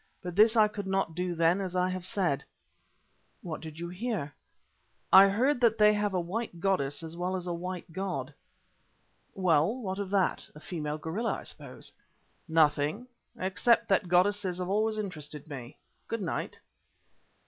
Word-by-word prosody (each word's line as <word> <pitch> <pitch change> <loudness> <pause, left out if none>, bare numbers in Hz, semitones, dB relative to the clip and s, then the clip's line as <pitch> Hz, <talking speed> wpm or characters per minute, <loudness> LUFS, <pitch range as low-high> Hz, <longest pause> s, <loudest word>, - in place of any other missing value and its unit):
But 180 -1 -5
this 215 +3 +6
I 215 -2 +6
could 210 -2 -6
not 190 -4 0
do 180 +1 -2
then 170 +4 +3
as 185 -2 -4
I 180 0 +2
have 185 -1 -4
said." 180 -8 +1
"And - - -17 1.1
what 155 - -4
did 155 -1 -9
you 170 +1 -5
hear?" 180 -6 -3 0.8
"I 195 +1 +10
heard 250 +6 +1
that 230 -2 +4
they 210 0 +6
had 205 -1 0
a - - +2
white 180 +1 -4
goddess 165 -6 0
as 160 0 -7
well 180 +2 -2
as 180 -1 -4
a 175 - -2
white 175 -1 -6
god." 165 -7 -3 1.0
"Well, 175 +1 +3
what 190 -4 -4
of 200 -2 -4
it? 195 -2 +1
A - - -10
female 155 -2 -4
gorilla, 175 +10 -2
I - - -6
suppose." - - -8 0.6
"Nothing, 155 +6 +2 0.3
except 190 +5 +2
that 190 -2 +2
goddesses 185 +1 +2
have 180 0 -3
always 215 +2 +1
interested 155 -7 -5
me. 130 -4 -8 0.3
Good 230 -3 -3
night." 170 - -3
185 Hz, 170 wpm, -29 LUFS, 165-205 Hz, 1.1 s, I